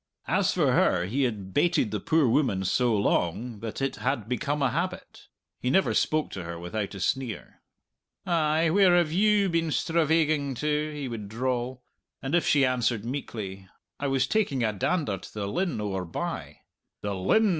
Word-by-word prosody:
As - - +2
for - - +2
her, 90 0 +3
he 130 +8 0
had 100 -6 -4
baited 170 - +2
the 105 - -1
poor 160 +4 +2
woman 115 -7 +1
so 120 +4 +2
long 105 +4 0
that 115 +4 -5
it 135 - -1
had 115 0 -1
become 145 +4 -1
a 135 - +2
habit; 180 +4 -4 0.3
he 125 - -1
never 190 +9 +3
spoke 155 0 +1
to 95 - -5
her 85 0 -6
without 95 +4 -4
a - - -6
sneer. 125 +4 -3 0.6
"Ay, 160 -1 +2
where 185 -1 +5
have 170 -3 +2
you 205 +2 +3
been 165 -2 0
stravaiging 155 -3 +1
to?" 150 +3 -1
he 145 -2 -5
would 110 -4 -6
drawl; 125 +2 -2 0.4
and 135 +3 -5
if 175 - +2
she 140 -2 +4
answered 120 -4 0
meekly, 105 -7 -5 0.3
"I 145 - -1
was 135 -1 +2
taking 170 - 0
a 110 -2 +1
dander 105 - -1
to - - -12
the 100 -2 -3
linn 175 - -1
owre 95 -3 -2
bye," 85 - -5 0.4
"The 100 -1 -2
Linn!" 150 - +3
130 Hz, 175 wpm, -27 LUFS, 105-155 Hz, 0.6 s, where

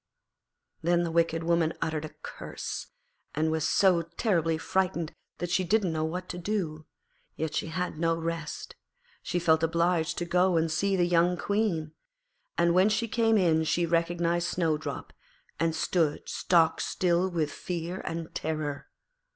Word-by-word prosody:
Then 175 +1 +2
the 170 - -2
wicked 165 0 +1
woman 170 -1 +2
uttered 155 -1 -2
a 155 - -11
curse, - - -6 0.5
and 155 +1 +1
was 160 -1 0
so 185 -4 +4
terribly 165 -1 0
frightened 175 -1 -1 0.2
that 175 -1 -4
she 180 +2 +2
didn't 185 -1 +1
know 155 0 -1
what 180 +3 -3
to 180 - -5
do. 170 -5 -3 0.5
Yet 160 -1 -3
she - - -1
had 165 0 -3
no 165 0 +2
rest: 165 -1 -4 0.5
she 180 - -2
felt 160 -2 +3
obliged 165 0 +1
to 175 - -1
go 180 +1 +3
and 160 0 +1
see 195 +4 +1
the 175 -2 +3
young 175 +1 +3
Queen. 195 -8 0 0.7
And 170 0 +3
when 185 +3 +5
she 230 +2 0
came 225 0 +3
in 165 -4 +3
she 170 +2 +1
recognised 170 +1 +1
Snowdrop, 160 -3 -2 0.5
and 165 -1 +1
stood 160 -2 0
stock 165 -3 +2
still 180 +1 +1
with 160 -5 -1
fear 175 +3 -4
and 165 -1 -5
terror. 155 -2 -3
170 Hz, 155 wpm, -28 LUFS, 160-180 Hz, 0.7 s, when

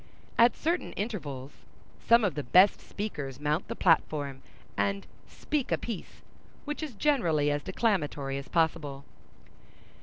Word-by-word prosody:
At 235 +1 +5
certain 335 +3 -1
intervals, 150 - -4 0.6
some 235 0 +6
of 200 - +1
the 150 - -3
best 180 +10 +5
speakers 145 -11 -5
mount 150 +4 0
the - - -4
platform, 145 -5 +1 0.3
and 200 0 0 0.2
"speak 295 -4 -3
a - - +3
piece," 230 -6 -7 0.4
which 295 +1 -4
is 300 -7 -5
generally 170 - +2
as 145 0 -1
declamatory 150 -9 -1
as 140 - -9
possible. 155 -4 0
165 Hz, 130 wpm, -29 LUFS, 145-225 Hz, 0.6 s, some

